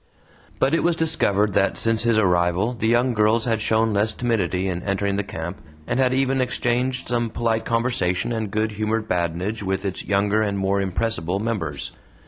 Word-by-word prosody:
But 135 Hz, +3 st, +1 dB
it 165 Hz, -, +3 dB
was 175 Hz, -1 st, +2 dB
discovered 105 Hz, -, +2 dB
that 100 Hz, -, +2 dB
since 115 Hz, -1 st, +1 dB
his 115 Hz, -1 st, +2 dB
arrival 90 Hz, +2 st, +2 dB
the 110 Hz, -2 st, -2 dB
young 120 Hz, +2 st, +3 dB
girls 110 Hz, +1 st, +2 dB
had 115 Hz, -2 st, 0 dB
shown 110 Hz, 0 st, +2 dB
less 105 Hz, +2 st, +2 dB
timidity 95 Hz, -7 st, -1 dB
in 90 Hz, -2 st, -2 dB
entering 100 Hz, +1 st, -1 dB
the 100 Hz, -, -1 dB
camp, 85 Hz, -1 st, -6 dB, 0.2 s
and 120 Hz, +8 st, -1 dB
had 130 Hz, -1 st, +3 dB
even 135 Hz, 0 st, +1 dB
exchanged 125 Hz, +1 st, -1 dB
some 120 Hz, -1 st, 0 dB
polite 115 Hz, 0 st, -1 dB
conversation 115 Hz, -5 st, 0 dB
and 110 Hz, -3 st, -2 dB
good 110 Hz, +2 st, -1 dB
humoured 110 Hz, +1 st, -2 dB
badinage 90 Hz, +5 st, -2 dB
with 95 Hz, 0 st, -2 dB
its 95 Hz, -2 st, -3 dB
younger 100 Hz, +2 st, +1 dB
and 100 Hz, -2 st, -1 dB
more 100 Hz, +1 st, +1 dB
impressible 95 Hz, -2 st, -1 dB
members. 95 Hz, -11 st, -3 dB
110 Hz, 180 wpm, -23 LUFS, 95-115 Hz, 0.2 s, it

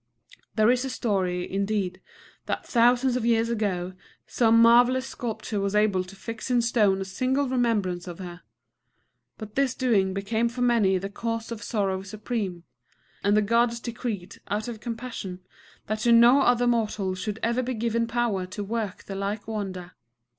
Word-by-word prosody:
There 215 Hz, +1 st, +5 dB
is 250 Hz, 0 st, +1 dB
a 265 Hz, -, -3 dB
story, 190 Hz, -8 st, -1 dB
indeed, 195 Hz, -2 st, -2 dB, 0.5 s
that -, -, -2 dB
thousands 245 Hz, +1 st, +3 dB
of 250 Hz, -, -1 dB
years 230 Hz, 0 st, +2 dB
ago 190 Hz, -5 st, -1 dB, 0.3 s
some 230 Hz, -1 st, +3 dB
marvellous 245 Hz, +3 st, +5 dB
sculptor 225 Hz, -4 st, -4 dB
was 200 Hz, +1 st, -1 dB
able 210 Hz, -3 st, +3 dB
to 185 Hz, +2 st, -12 dB
fix 225 Hz, +4 st, -7 dB
in 245 Hz, -2 st, +3 dB
stone 210 Hz, -5 st, +2 dB
a -, -, -3 dB
single 260 Hz, +8 st, 0 dB
remembrance 210 Hz, -9 st, 0 dB
of 175 Hz, -1 st, -7 dB
her. 180 Hz, -2 st, -8 dB, 1.0 s
But 215 Hz, -2 st, -9 dB
this 270 Hz, 0 st, +1 dB
doing 200 Hz, -7 st, +1 dB
became 220 Hz, +4 st, 0 dB
for 245 Hz, +1 st, -6 dB
many 220 Hz, -6 st, +3 dB
the 195 Hz, +2 st, -5 dB
cause 230 Hz, +1 st, -4 dB
of 225 Hz, -2 st, -5 dB
sorrow 195 Hz, -4 st, -1 dB
supreme; 200 Hz, -3 st, -4 dB, 0.6 s
and 205 Hz, +1 st, +3 dB
the 215 Hz, -, +4 dB
Gods 235 Hz, +2 st, +2 dB
decreed, 230 Hz, -6 st, -5 dB
out 210 Hz, +2 st, -2 dB
of 235 Hz, -2 st, -6 dB
compassion, 225 Hz, -5 st, -6 dB, 0.4 s
that 215 Hz, +1 st, -2 dB
to 235 Hz, +2 st, +2 dB
no 240 Hz, +4 st, +7 dB
other 245 Hz, 0 st, +3 dB
mortal 215 Hz, -5 st, 0 dB
should 200 Hz, +3 st, -4 dB
ever 235 Hz, +2 st, +1 dB
be 255 Hz, 0 st, -3 dB
given 230 Hz, +1 st, 0 dB
power 230 Hz, -6 st, -1 dB
to 205 Hz, +3 st, -5 dB
work 210 Hz, -2 st, -4 dB
the 195 Hz, -, -7 dB
like 200 Hz, +2 st, -3 dB
wonder. 190 Hz, -5 st, -5 dB
220 Hz, 170 wpm, -26 LUFS, 195-235 Hz, 1.0 s, no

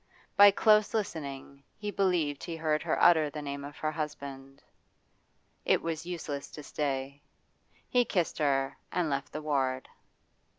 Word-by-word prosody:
By 205 Hz, 0 st, +9 dB
close 210 Hz, +2 st, +4 dB
listening 140 Hz, -9 st, -4 dB, 0.2 s
he 210 Hz, 0 st, -4 dB
believed 175 Hz, -8 st, 0 dB
he 170 Hz, -, -4 dB
heard 155 Hz, -2 st, 0 dB
her -, -, -1 dB
utter 160 Hz, -3 st, +5 dB
the 150 Hz, -, -7 dB
name 140 Hz, 0 st, -5 dB
of 145 Hz, +1 st, -9 dB
her 155 Hz, -, -1 dB
husband. 140 Hz, -3 st, -6 dB, 1.0 s
It -, -, +2 dB
was 165 Hz, 0 st, -3 dB
useless 150 Hz, -5 st, -5 dB
to 150 Hz, -, -8 dB
stay; 140 Hz, -1 st, -3 dB, 0.7 s
he 250 Hz, -1 st, +3 dB
kissed 180 Hz, -9 st, -1 dB
her 135 Hz, -2 st, +1 dB
and 170 Hz, -4 st, 0 dB
left 140 Hz, +1 st, -2 dB
the 155 Hz, -, -6 dB
ward. 130 Hz, -3 st, 0 dB
150 Hz, 145 wpm, -30 LUFS, 140-170 Hz, 1.0 s, By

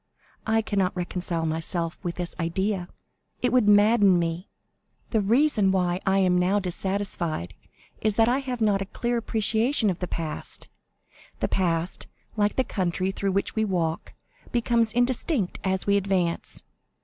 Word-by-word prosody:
I 220 Hz, 0 st, +2 dB
cannot 195 Hz, -4 st, 0 dB
reconcile 175 Hz, -2 st, -2 dB
myself 165 Hz, +1 st, -2 dB
to 175 Hz, -3 st, -2 dB
this 175 Hz, 0 st, -5 dB
idea—it 190 Hz, +6 st, -3 dB
would 245 Hz, -5 st, +4 dB
madden 205 Hz, -2 st, +5 dB
me. 170 Hz, +2 st, -2 dB, 0.6 s
The 220 Hz, -, +2 dB
reason 220 Hz, -2 st, +3 dB
why 180 Hz, -1 st, +1 dB
I 190 Hz, 0 st, +4 dB
am 180 Hz, -2 st, +3 dB
now 185 Hz, +3 st, +2 dB
dissatisfied 180 Hz, -, -2 dB, 0.5 s
is 215 Hz, -2 st, +1 dB
that 225 Hz, 0 st, +4 dB
I 250 Hz, +3 st, +2 dB
have 255 Hz, -3 st, -4 dB
not 205 Hz, -2 st, +2 dB
a -, -, -2 dB
clear 240 Hz, +3 st, -2 dB
appreciation 225 Hz, +1 st, +1 dB
of 180 Hz, -, -6 dB
the 180 Hz, -, -3 dB
past. 160 Hz, -3 st, -4 dB, 0.7 s
The -, -, 0 dB
past, 170 Hz, -2 st, 0 dB, 0.3 s
like 210 Hz, -1 st, +1 dB
the 260 Hz, -, +2 dB
country 185 Hz, -3 st, -1 dB
through 195 Hz, 0 st, -2 dB
which 200 Hz, -, 0 dB
we 220 Hz, -, +2 dB
walk, 170 Hz, -5 st, -2 dB, 0.4 s
becomes 235 Hz, -1 st, +2 dB
indistinct 245 Hz, -, 0 dB
as 190 Hz, 0 st, -1 dB
we 200 Hz, 0 st, +3 dB
advance. 185 Hz, -4 st, -1 dB
195 Hz, 150 wpm, -26 LUFS, 180-220 Hz, 0.7 s, madden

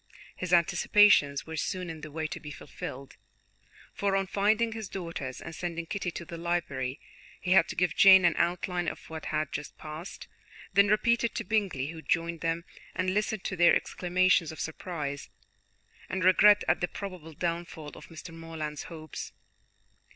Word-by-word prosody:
His 185 Hz, -1 st, -5 dB
anticipations 175 Hz, -3 st, +5 dB
were 160 Hz, -, -6 dB
soon 180 Hz, +3 st, -2 dB
in 160 Hz, -2 st, -7 dB
the 155 Hz, -, -7 dB
way 160 Hz, +1 st, -4 dB
to 155 Hz, -, -4 dB
be 150 Hz, -, -9 dB
fulfilled, 140 Hz, -2 st, -8 dB, 0.8 s
for 200 Hz, -1 st, 0 dB
on 195 Hz, 0 st, +1 dB
finding 215 Hz, +4 st, +2 dB
his 220 Hz, -3 st, -6 dB
daughters, 165 Hz, -8 st, -5 dB
and 170 Hz, -, -8 dB
sending 170 Hz, 0 st, -4 dB
Kitty 190 Hz, +1 st, -3 dB
to 170 Hz, 0 st, -7 dB
the 170 Hz, 0 st, -8 dB
library, 145 Hz, -7 st, -2 dB, 0.4 s
he 180 Hz, -, -3 dB
had 185 Hz, -3 st, +6 dB
to -, -, -6 dB
give 180 Hz, -2 st, +1 dB
Jane 190 Hz, -2 st, +8 dB
an 170 Hz, -, +5 dB
outline 175 Hz, 0 st, 0 dB
of -, -, -6 dB
what 160 Hz, -1 st, -6 dB
had 155 Hz, -1 st, -1 dB
just 150 Hz, 0 st, -6 dB
passed, 155 Hz, +4 st, -8 dB, 0.5 s
then 200 Hz, +1 st, +6 dB
repeat 235 Hz, +3 st, +3 dB
it 235 Hz, -, -1 dB
to -, -, -2 dB
Bingley, 195 Hz, -11 st, 0 dB
who 165 Hz, -1 st, -9 dB
joined 170 Hz, 0 st, -1 dB
them, 165 Hz, +1 st, -1 dB, 0.3 s
and 185 Hz, 0 st, 0 dB
listened 210 Hz, 0 st, -1 dB
to 185 Hz, -, -3 dB
their 175 Hz, -1 st, +6 dB
exclamations 180 Hz, -2 st, +2 dB
of 160 Hz, -, -10 dB
surprise, 150 Hz, -4 st, -4 dB, 0.8 s
and 185 Hz, 0 st, -2 dB
regret 205 Hz, +3 st, +6 dB
at -, -, +2 dB
the 175 Hz, -, +1 dB
probable 180 Hz, -5 st, -8 dB
downfall 170 Hz, -1 st, -4 dB
of -, -, -12 dB
Mr. 165 Hz, 0 st, -10 dB
Morland's 160 Hz, -2 st, -6 dB
hopes. 155 Hz, -3 st, -8 dB
170 Hz, 175 wpm, -29 LUFS, 160-185 Hz, 0.8 s, Jane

